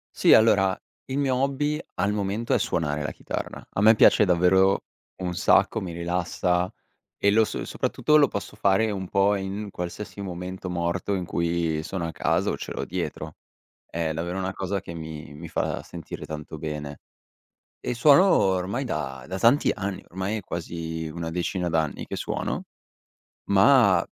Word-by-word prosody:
Sì, - - +5
allora 95 -3 +5 0.3
il 130 - -4
mio 135 -2 +1
hobby 140 +3 0 0.2
al 100 - +1
momento 105 +3 -1
è - - +3
suonare 75 -2 -1
la 75 - -3
chitarra. - - -6
A - - -1
me 110 +2 +7
piace 105 - +6
davvero 95 +2 +4 0.4
un 90 -1 -2
sacco, - - +3
mi 90 -3 -5
rilassa 90 +1 0 0.5
e 100 - +3
lo 110 +1 +5
so - - -4
soprattutto 150 - +1
lo 145 -3 +6
posso 100 - -5
fare 105 +1 +2
un 95 -2 -4
po' 100 +2 +3
in 100 +1 -4
qualsiasi 90 +3 -6
momento 90 0 -5
morto 85 +3 -1
in 95 -2 -2
cui 85 -2 -1
sono 85 +1 -3
a 80 - -5
casa - - +1
o - - -2
ce - - -7
l'ho - - -3
dietro. 75 0 -4 0.6
È 85 -1 -2
davvero 85 +3 -3
una 95 0 -2
cosa 95 0 -3
che 85 - -8
mi 80 -2 -8
mi 80 +3 -9
fa - - -2
sentire 85 -3 -8
tanto 80 0 -7
bene. 75 -2 -5 0.8
E 125 - -3
suono 145 +10 +6
ormai 95 - +2
da 65 - -4
da 95 +2 -4
tanti 120 +7 +4
anni, 100 -2 -4
ormai 95 +4 -2
è - - -5
quasi 80 -2 -5
una 80 +1 -5
decina 90 +1 -2
d'anni 80 -3 -1
che - - -5
suono, - - -3 0.8
ma 100 -2 +5
95 Hz, 170 wpm, -25 LUFS, 85-100 Hz, 0.8 s, me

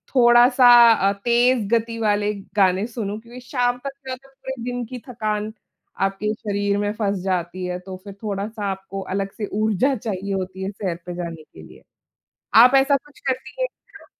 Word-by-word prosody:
थोड़ा-सा 245 +1 +6 0.3
अ, 200 -2 +2
तेज़ 240 +2 +2
गति 230 0 -2
वाले 210 -1 +1 0.2
गाने 190 0 +3
सुनूँ। 215 -3 -4
क्योंकि 240 +2 -12
शाम 245 -2 0
तक 275 - -2 0.2
पूरे 265 -1 -8
दिन 245 0 -3
की 250 +2 -8
थकान 215 -2 -3 0.5
आपके 195 +2 0
शरीर 205 -2 -1
में 205 0 0
फँस 200 -2 0
जाती 180 -1 -2
है 180 0 -3
तो 185 0 -9
फिर 200 -1 -9
थोड़ा-सा 205 +1 -4
आपको 195 0 -6
अलग 195 0 -2
से 210 - -2
ऊर्जा 215 +5 +1
चाहिए 200 -3 -4
होती 190 0 -4
है 195 - -3
सैर 190 -4 -3
पे 175 - -5
जाने 165 -3 -6
के - - -16
लिए। - - -15 0.8
आप 250 +3 +8
ऐसा 270 +1 +5
कुछ 295 +2 -20
करती 260 0 -3
है - - +3
क्या? - - -19
210 Hz, 175 wpm, -22 LUFS, 195-245 Hz, 0.8 s, आप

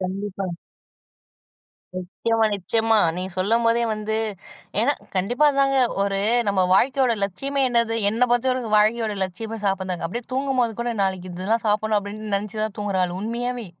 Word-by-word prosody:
கண்டிப்பா. 195 +1 -4 1.5
நிச்சயமா, 220 +5 0
நிச்சயமா. 225 +3 +1 0.2
நீங்க 185 +1 -4
சொல்லும்போதே 230 +4 +2
வந்து 215 0 -2 0.6
ஏன்னா, 260 +6 +3 0.2
கண்டிப்பா. 220 +10 +1
அதாங்க 275 0 +2 0.3
ஒரு 200 0 0 0.3
நம்ம 200 -1 +2
வாழ்க்கையோட 260 +4 +3
லட்சியமே 275 +9 -3
என்னது? 235 -2 +1 0.2
என்ன 225 +3 -3
பொறுத்தவரைக்கும் 245 -2 +2
வாழ்க்கையோட 215 0 +2
லட்சியமே 220 +5 -6
சாப்ட்றதாங்க. 190 -3 -1
அப்டியே 235 +8 -5
தூங்கும்போது 260 -3 +1
கூட 240 0 -1
நாளைக்கு 190 -1 -2
இதெல்லாம் 195 +6 -1
சாப்டணும் 215 +1 +1
அப்டின்னு 210 +1 -6
நெனச்சுதான் 215 +1 -3
தூங்குற 205 -2 -1
ஆளு, 175 - -4
உண்மையாவே. 240 +2 -3
215 Hz, 130 wpm, -23 LUFS, 195-235 Hz, 1.5 s, ஏன்னா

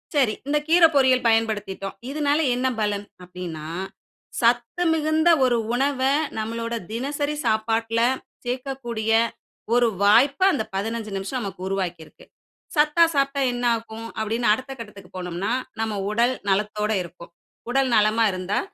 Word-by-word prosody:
சரி 260 -7 +3
இந்த 295 +1 +2
கீர 335 +1 +6
பொரியல் 260 -2 +4
பயன்படுத்திட்டோம். 210 -4 -1
இதனால 290 +1 +1 0.2
என்ன 255 +1 0
பலன்? 205 -1 -1 0.2
அப்படீன்னா, 180 -4 -7 0.8
சத்து 240 +8 +2
மிகுந்த 315 +1 +2 0.2
ஒரு 245 -2 +2 0.2
உணவ 270 +1 0 0.4
நம்மளோட 230 +1 -3 0.2
தினசரி 285 +5 -2
சாப்பாட்டில 225 +1 +1 0.5
சேக்கக்கூடிய 245 -3 -3 0.6
ஒரு 245 -1 +4 0.2
வாய்ப்ப 250 - +5
அந்த 245 - 0
15 220 +2 -3
நிமிஷம் 195 +7 -3
நமக்கு 195 -3 -6
உருவாக்கி 185 -3 -2
இருக்கு. - - -19 0.5
"சத்தா 300 +2 +4
சாப்பிட்டா 275 0 +1
என்ன 245 0 -4
ஆகும்?" 225 0 -7
அப்படீன்னு 225 +2 -1
அடுத்த 260 +4 -5
கட்டத்துக்கு 200 -5 -11
போனோம்ன்னா, 180 +3 -3 0.3
நம்ம 220 -1 -1 0.2
உடல் 235 +4 +2 0.2
நலத்தோட 210 +2 0
இருக்கும். 170 0 -12 0.4
உடல் 265 +1 +2
நலமா 215 +1 +3
இருந்தா? 185 +2 -2
230 Hz, 130 wpm, -23 LUFS, 210-265 Hz, 0.8 s, கீர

